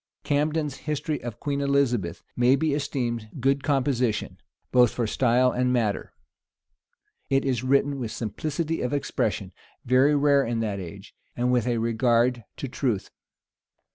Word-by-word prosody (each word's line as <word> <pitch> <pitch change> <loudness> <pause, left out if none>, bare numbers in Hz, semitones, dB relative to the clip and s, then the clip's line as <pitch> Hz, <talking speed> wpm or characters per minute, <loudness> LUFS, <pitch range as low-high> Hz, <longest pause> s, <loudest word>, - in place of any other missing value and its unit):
Camden's 150 -1 0
history 150 0 -2
of 120 -2 -7
Queen 140 -1 -2
Elizabeth 125 -11 0
may 125 +2 +4
be 150 +1 0
esteemed 120 -6 -2
good 135 +2 +1
composition, 130 -6 0 0.3
both 125 -2 +6
for 120 - -1
style 125 +2 +3
and 125 0 +1
matter. 115 -5 0 1.2
It 135 0 +2
is 130 -3 0
written 140 +1 +2
with 120 -3 -3
simplicity 155 - -3
of 125 - -2
expression, 145 - -2 0.3
very 130 +4 +4
rare 140 -1 +4
in 115 -2 -2
that 105 -3 -2
age, 95 +3 -9 0.2
and 125 +1 +1
with 125 -1 +1
a 120 -1 +1
regard 115 +1 +1
to 135 - -4
truth. 120 -6 -2
125 Hz, 140 wpm, -25 LUFS, 115-140 Hz, 1.2 s, both